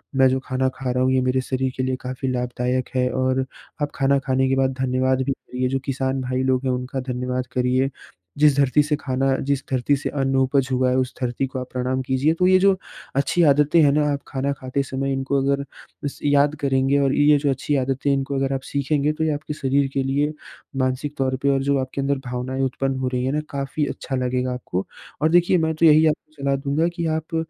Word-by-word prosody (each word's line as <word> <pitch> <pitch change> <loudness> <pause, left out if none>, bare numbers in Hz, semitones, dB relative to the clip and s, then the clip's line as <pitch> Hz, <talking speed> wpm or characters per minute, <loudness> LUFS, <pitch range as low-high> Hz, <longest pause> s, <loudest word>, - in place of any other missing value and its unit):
मैं 135 0 +5
जो 130 +1 +1
खाना 130 0 0
खा 130 -2 -3
रहा 125 +1 +1
हूँ 130 - +2
ये 130 - +3
मेरे 130 +1 +1
शरीर 130 0 -2
के 130 - 0
लिए 130 0 0
काफ़ी 130 +1 -4
लाभदायक 125 0 -2
है 125 0 +2
और 130 +1 0 0.4
आप 145 - -1
खाना 140 0 +2
खाने 130 0 +2
के 135 - +2
बाद 135 0 +1
धन्यवाद 130 0 +1
भी 135 - -1
करिए 130 -1 -3
जो 135 +1 0
किसान 135 0 -1
भाई 130 0 -1
लोग 130 0 +1
हैं 130 - +1
उनका 125 +1 -3
धन्यवाद 125 0 -3
करिए। 130 +1 +1 0.5
जिस 150 -2 +5
धरती 140 +1 +4
से 150 0 0
खाना 135 0 0
जिस 140 -1 +1
धरती 130 +2 +2
से 135 - -3
अन्न 135 -2 -1
उपज 130 0 +2
हुआ 130 0 +2
है 125 - +1
उस 130 -1 -1
धरती 125 +1 -1
को 130 0 -5
आप 130 0 -7
प्रणाम 130 +1 -1
कीजिए। 130 +4 +1
तो 180 +2 +2
ये 185 0 +6
जो 195 +1 +5 0.4
अच्छी 140 +5 +2
आदतें 150 +2 +4
हैं 145 - +5
ना, 150 +1 +2
आप 140 - -2
खाना 135 0 -2
खाते 135 0 -3
समय 135 0 -3
इनको 135 +1 0
अगर 140 +1 +1 0.4
स 140 - -8
याद 145 +1 +3
करेंगे 135 0 +2
और 135 -1 +2
ये 145 0 +5
जो 145 0 0
अच्छी 140 +2 -1
आदतें 135 +1 0
इनको 135 0 -1
अगर 135 0 0
आप 135 - -2
सीखेंगे 145 +1 0
तो 155 - -2
ये 160 - +1
आपके 150 +1 -5
शरीर 140 -1 +1
के 135 - 0
लिए, 145 +3 0 0.4
मानसिक 130 +2 -1
तौर 130 -1 0
पर 140 - +3
और 135 0 0
जो 140 0 +2
आपके 130 +1 -3
अंदर 140 +1 0
भावनाएँ 125 +2 -3
उत्पन्न 135 0 -1
हो 130 - -1
रही 125 0 0
है 130 - 0
न - - 0
काफ़ी 140 +2 -2
अच्छा 135 - -4
लगेगा 125 0 -1
आपको। 100 -6 -4 0.4
और 155 - +3
देखिए 175 +1 +4
मैं 160 -1 +1
तो 165 - +2
यही 155 0 +7
आपको 155 0 -2
सलाह 140 0 +1
दूँगा 140 +4 0
कि 170 -1 -2
आप 160 +1 -6
135 Hz, 230 wpm, -22 LUFS, 130-140 Hz, 0.5 s, यही